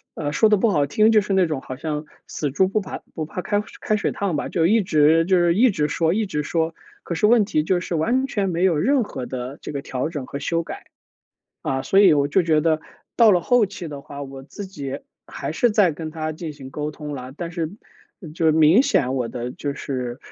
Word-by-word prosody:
呃， 145 -2 -3
说 220 +8 +4
得 210 - +4
不 225 +4 +2
好 145 -8 +2
听， 215 +10 +3
就 215 - +6
是 205 - -5
那 190 -1 +4
种 155 -5 -3
好 130 - -7
像 150 +1 -4 0.2
死 145 -3 -3
猪 185 +7 +3
不 210 +3 0
怕 190 - -6 0.2
不 160 - -4
怕 180 - -5
开 205 +2 0 0.2
开 215 - 0
水 210 - -1
烫 195 -5 -2
吧， 145 - -3
就 165 -1 +2
一 220 +4 +4
直 160 -2 +4
就 185 +2 +3
是 175 -1 +3
一 245 +6 +5
直 150 -8 0
说 165 +2 +1
一 220 +2 0
直 150 -6 -3
说， 165 +2 -1 0.3
可 170 - -4
是 165 - +2
问 225 -2 +5
题 155 -6 0
就 180 +3 +1
是 175 -1 -4
完 245 +12 +1
全 200 -6 -1
没 175 +1 +1
有 175 -5 +3
任 260 - +2
何 130 -9 -6
的 130 +2 -6
这 - - -6
个 140 -2 -4
调 130 +1 -3
整 145 -6 -5
和 140 - -6
修 165 +4 -1
改。 - - -9 0.8
啊， 130 0 -1
所 195 +9 +3
以 190 -6 +7
我 140 -1 +2
就 180 +6 +2
觉 160 -2 +2
得 155 0 +1 0.4
到 230 -2 +7
了 180 -3 +4
后 245 +5 +3
期 195 -3 -7
的 145 -3 -7
话， 140 0 -9
我 135 -1 -9
自 195 +8 -8
己 140 -8 -6 0.3
还 - - -5
是 240 - +2
再 205 -5 +3
跟 155 +1 -6
他 155 0 -4
进 160 0 -6
行 135 -2 -11
沟 150 +2 -3
通 150 -1 -7
了， 130 -1 -7
但 170 0 -5
是 165 -3 -3 0.6
就 160 -1 +3
明 160 +8 +5
显 130 - +1
我 125 -3 -1
的 125 +1 -5
就 140 +1 -4
是， 125 -3 -4
160 Hz, 265 characters per minute, -22 LUFS, 145-195 Hz, 0.8 s, 以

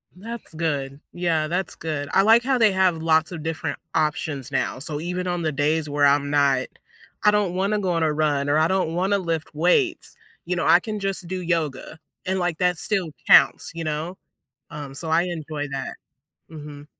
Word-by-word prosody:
That's 225 -1 -9
good. 145 -4 -2
Yeah, 165 -3 0
that's 180 +1 -2
good. 150 -3 -4
I 195 - +5
like 225 +2 +6
how 265 -1 +1
they 220 -3 +5
have 185 -3 +2
lots 160 +1 +2
of 160 -3 -6
different 160 -2 -3 0.2
options 150 -3 -1
now, 130 - -1
so 150 0 -4
even 180 +2 -3
on 175 -1 -1
the 155 -1 0
days 150 +2 0
where 145 0 +2
I'm 140 0 +3
not, 140 -3 +2 0.6
"I 210 - +6
don't 205 -4 +1
wanna 200 +3 0
go 185 -3 -1
on 165 -1 +1
a 155 - +2
run, 145 -2 0
or 150 - +3
I 160 +1 +4
don't 185 -3 0
wanna 195 +3 +1
lift 165 -3 -3
weights," 255 - +1 0.3
you - - -1
know, - - -1
I - - +7
can 215 -2 -4
just 195 -3 -3
do 185 +1 -3
yoga, 165 -3 -2 0.3
and, 190 0 0
like, 175 -2 -1
that 180 -2 +2
still 185 -5 -1 0.2
counts, - - +5
you 165 -1 -5
know, 155 +5 -3 0.5
um, 145 -2 -8
so 160 +3 -5
I 165 +2 +4
enjoy 155 -4 -4
that. 135 - -4 0.5
Mhm. 150 -2 -10
160 Hz, 200 wpm, -23 LUFS, 150-185 Hz, 0.6 s, I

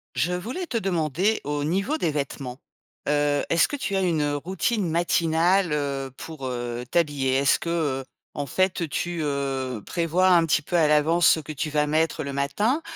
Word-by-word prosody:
Je 180 - +1
voulais 235 - -4
te 245 -8 -2
demander 180 +1 0
au 145 0 -2
niveau 195 - 0
des 165 - 0
vêtements, 140 -2 -4 0.5
heu: 145 0 +2
est-ce 170 - +4
que 290 - -4
tu 215 -8 -3
as 190 - +2
une, 170 -4 +1
heu, 145 0 0
routine 190 - -1
matinale, 170 +2 +2
heu, 140 -2 -2
pour, 155 -5 -7
heu, 120 -1 -4
t'habiller? 145 -6 +1
Est-ce 135 0 +3
que, 170 - -4
heu, 145 -6 -1 0.3
en 145 -1 -4
fait 180 +2 0
tu, 175 +3 -2
heu, 135 -5 -2
prévois 175 +2 +1
un 170 -2 +5
petit 155 -1 +2
peu 175 - -3
à 160 -2 +4
l'avance 155 +3 +4
ce - - +5
que 155 - -8
tu 155 +2 -3
vas 150 0 +1
mettre 155 +2 0
le 140 -1 -5
matin 205 - 0
155 Hz, 190 wpm, -25 LUFS, 140-175 Hz, 0.5 s, un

